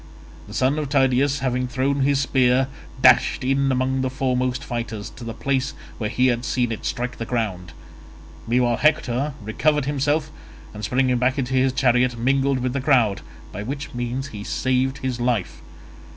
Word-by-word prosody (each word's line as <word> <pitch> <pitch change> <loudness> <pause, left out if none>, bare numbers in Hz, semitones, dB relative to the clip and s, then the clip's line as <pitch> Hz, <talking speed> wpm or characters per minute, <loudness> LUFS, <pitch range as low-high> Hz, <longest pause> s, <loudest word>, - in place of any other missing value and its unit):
The 105 - -9
son 130 +5 +2
of 150 -3 -3
Tydeus 135 0 +2
having 125 -1 0
thrown 135 +2 0
his 140 0 +2
spear 130 -1 +2 0.3
dashed - - +5
in 135 +1 +1
among 130 +1 0
the 130 - 0
foremost 130 -1 -1
fighters, 115 -4 -5
to 125 - -11
the 115 - -5
place 135 +1 -1 0.2
where 110 -2 -1
he 125 - +1
had 120 -1 +1
seen 125 -1 0
it 110 - -5
strike 125 +1 -3
the - - -2
ground; 105 -7 -2 0.8
meanwhile 120 0 +2
Hector 140 -2 +1
recovered 150 +7 +1
himself 145 +2 0 0.4
and 105 0 -8
springing 125 +3 +1
back 130 +3 +1
into 130 -1 -2
his 130 0 +3
chariot 125 -2 +2
mingled 135 +3 +1
with 125 0 -1
the 140 - -1
crowd, 125 -8 +3 0.3
by 100 - -6
which 140 +6 -5
means 120 +3 -3
he 105 -4 -7
saved 130 +4 0
his 130 -3 -3
life. 120 -6 -1
130 Hz, 170 wpm, -22 LUFS, 120-135 Hz, 0.8 s, dashed